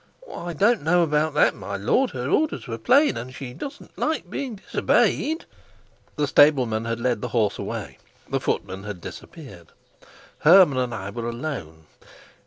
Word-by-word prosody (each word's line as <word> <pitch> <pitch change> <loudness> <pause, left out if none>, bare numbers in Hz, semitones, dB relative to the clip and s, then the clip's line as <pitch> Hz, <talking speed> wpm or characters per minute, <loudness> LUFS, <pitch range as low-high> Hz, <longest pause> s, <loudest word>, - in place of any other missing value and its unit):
"I 175 0 -5
don't 210 +9 +3
know 175 +4 +3
about 150 -1 0
that, - - +4
my 100 -1 -6
lord: 245 - +1
her 125 0 -5
orders 310 - 0
were 115 -3 -5
plain, 285 - +4
and 125 +2 -6
she 130 -3 -7
doesn't 275 - -9
like 315 0 -2
being 260 -5 -4
disobeyed." 315 - +1 0.7
The 150 - +1
stableman 130 -7 +4
had 115 0 -2
led 120 -3 0
the - - -2
horse 110 -4 0
away, 100 - -6 0.3
the - - -1
footman 95 0 -3
had 105 -3 -6
disappeared, 100 - -11 0.7
Hermann 165 -5 +6
and 125 -1 -1
I 100 -2 -6
were 115 +2 -4
alone. 115 - -6
130 Hz, 160 wpm, -24 LUFS, 110-170 Hz, 0.7 s, Hermann